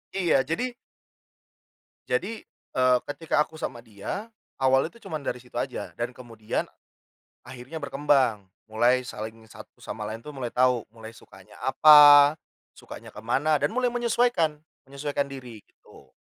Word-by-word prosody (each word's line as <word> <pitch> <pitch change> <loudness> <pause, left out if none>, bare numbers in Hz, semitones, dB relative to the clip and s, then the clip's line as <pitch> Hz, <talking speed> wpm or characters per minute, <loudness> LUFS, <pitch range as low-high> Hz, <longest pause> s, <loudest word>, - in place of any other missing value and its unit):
Iya, 175 -7 +2
jadi 165 - -2 1.4
jadi, 225 -1 -2 0.3
eee, 130 -1 +4 0.2
ketika 150 0 0
aku 160 - -12
sama 120 -2 -5
dia, 115 - -6 0.3
awalnya 135 +4 +2
itu 235 - -13
cuman 155 -1 -4
dari 125 - -3
situ 125 0 -15
aja 130 - -4
dan 120 +1 -3
kemudian, 115 -4 -5 0.8
akhirnya 130 +5 -9
berkembang 135 -7 +1 0.2
mulai 120 +3 +3
saling 110 -1 -8
satu - - -15
sama - - -7
lain 110 +1 -5
tuh 150 +4 -11
mulai 125 -3 -4
tahu 125 -2 +2
mulai 115 0 -12
sukanya 95 -3 -17
apa, 145 +1 +8 0.4
sukanya - - -11
ke - - -9
mana 140 +7 +1
dan - - +1
mulai 250 +2 +1
menyesuaikan, 235 -10 +1 0.3
menyesuaikan 140 +1 -3
diri, 125 -6 -10
gitu. 65 -2 -21
130 Hz, 140 wpm, -26 LUFS, 120-150 Hz, 1.4 s, apa